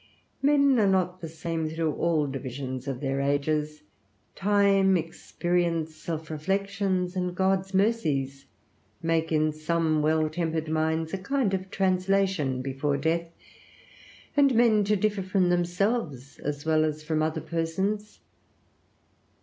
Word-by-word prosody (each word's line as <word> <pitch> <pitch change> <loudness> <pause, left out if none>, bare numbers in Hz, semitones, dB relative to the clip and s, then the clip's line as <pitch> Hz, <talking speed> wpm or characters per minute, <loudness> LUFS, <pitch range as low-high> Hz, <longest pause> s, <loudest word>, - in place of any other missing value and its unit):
Men 280 -2 +4
are 205 - +4
not 185 -1 0
the 165 - -6
same 165 0 -3
through 160 -1 -1
all 165 -3 +1
divisions 130 -1 -5
of 135 -2 -4
their 135 -1 -1
ages: 150 +2 -1 0.5
time, 195 -1 +3
experience, 165 0 -2
self 160 0 -5
reflections, 195 +2 -1
and 180 -1 -2
God's 190 0 0
mercies, 150 - 0 0.6
make 165 0 0
in 155 0 +2
some 155 0 0
well 155 +1 +2
tempered 160 0 -2
minds 160 +1 -1
a 195 - -2
kind 235 0 0
of 190 0 -3
translation 185 -8 +1
before 140 +2 -1
death, 165 +4 0 1.1
and 280 -3 +4
men 225 -3 +4
to 210 +1 +2
differ 210 0 0
from 185 -1 +1
themselves 175 - -1
as 145 0 -4
well 155 -1 +3
as 155 0 -2
from 155 0 0
other 155 0 0
persons. 190 +6 -2
165 Hz, 130 wpm, -27 LUFS, 155-195 Hz, 1.1 s, Men